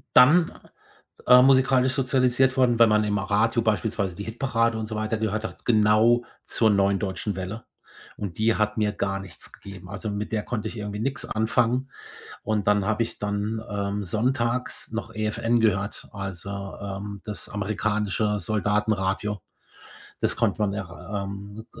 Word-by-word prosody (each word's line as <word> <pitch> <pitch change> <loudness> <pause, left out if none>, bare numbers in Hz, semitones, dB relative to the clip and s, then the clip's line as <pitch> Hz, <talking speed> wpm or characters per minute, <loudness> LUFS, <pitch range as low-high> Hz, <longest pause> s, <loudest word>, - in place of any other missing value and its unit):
dann, 160 +7 +7 0.8
äh, 125 0 +9
musikalisch 130 -1 +4
sozialisiert 130 -1 +2
worden, 120 -3 +3
wenn 115 -1 +7
man 105 0 +3
im 105 -1 0
Radio 105 +4 +1
beispielsweise 105 -4 0
die 100 - -6
Hitparade 115 0 0
und 110 - -3
so 110 - -5
weiter 110 +1 -1
gehört 110 0 -1
hat, - - -8
genau 110 +1 +4 0.2
zur 110 - +2
neuen 100 -1 +3
Deutschen 100 0 -3
Welle, 95 +5 -5 0.5
und 95 -5 -5
die 110 +1 +2
hat 105 +1 0
mir 105 -1 +2
gar 95 -1 -2
nichts 95 -3 -9
gegeben, 95 -2 -11
also 105 +2 -4
mit 105 +1 -4
der 110 -2 -1
konnte 110 -3 -3
ich 115 - -7
irgendwie 105 0 -5
nix 135 +5 -2
anfangen 125 +3 +1 0.5
und 105 -2 -1
dann 105 -1 +3
habe 110 +2 +1
ich 115 - -7
dann, 105 +2 -2
ähm, 100 0 -2
sonntags 120 +6 -1
noch 115 0 -5
EFN 110 +2 0
gehört, 100 -2 0
also, 100 0 -6
ähm, 100 0 -6
das 105 -4 -6
amerikanische 105 +1 -1
Soldatenradio. 105 0 0 0.8
Das - - +1
konnte - - 0
man 105 -2 +1
er 95 +1 -5
ähm, 100 +3 -8
k - - -13
105 Hz, 160 wpm, -25 LUFS, 100-115 Hz, 0.8 s, äh